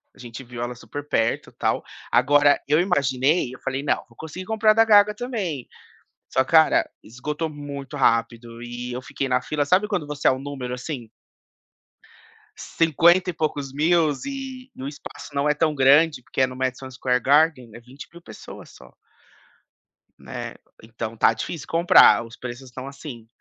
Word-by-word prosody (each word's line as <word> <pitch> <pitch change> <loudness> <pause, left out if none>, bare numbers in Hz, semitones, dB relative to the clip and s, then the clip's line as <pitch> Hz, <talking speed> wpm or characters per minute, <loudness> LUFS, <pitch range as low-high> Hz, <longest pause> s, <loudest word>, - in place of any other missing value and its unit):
a - - -21
gente 120 +1 -9
viu 120 -1 -8
ela 120 +1 -4
super 145 +4 -8
perto, 115 -4 -1
tal, - - -1 0.3
agora, 145 +4 +4
eu 150 +2 +3
imaginei 140 -4 +1
eu - - -15
falei: 135 0 -3
"Não, 145 - +1
vou 115 - -21
conseguir 160 +4 -8
comprar 220 +1 +3
o - - +4
da 225 - +6
Gaga 210 -1 +5
também", 205 - -4 0.7
só 130 - +3
cara, 160 +3 +4
esgotou 150 +8 -5
muito 145 -2 -8
rápido 115 -2 0
e 120 +1 -6
eu 125 - -4
fiquei 135 +1 -4
na 125 0 +2
fila 150 -1 -1
sabe 185 +8 +2
quando 190 -8 -2
você 150 -1 -3
é - - +5
um 130 - -3
número, 135 -3 -5
assim 125 -2 -6 1.5
cinquenta 170 +3 +3
e - - -2
poucos 145 -3 -3
mil 160 +2 +3 0.2
e 265 -2 -7
o 135 - -4
espaço 145 0 -10
não 140 +1 +1
é - - +4
tão 155 +1 +1
grande, 145 +1 +4
porque 130 - -3
é 130 - +4
no 130 - -9
Madison 130 0 -3
Square 125 0 -1
Garden, 145 -4 +3
é 120 - -10
20.000 135 +8 -13
pessoas 110 -10 -12
só 65 -1 -16 1.3
né, - - -7 0.3
então 115 0 -6
tá 115 - +4
difícil 145 +7 -6
comprar. 165 -7 +6
Os 115 - -13
preços 125 +1 -8
estão 130 +2 -8
assim, 135 -5 -10
140 Hz, 170 wpm, -23 LUFS, 125-160 Hz, 1.5 s, da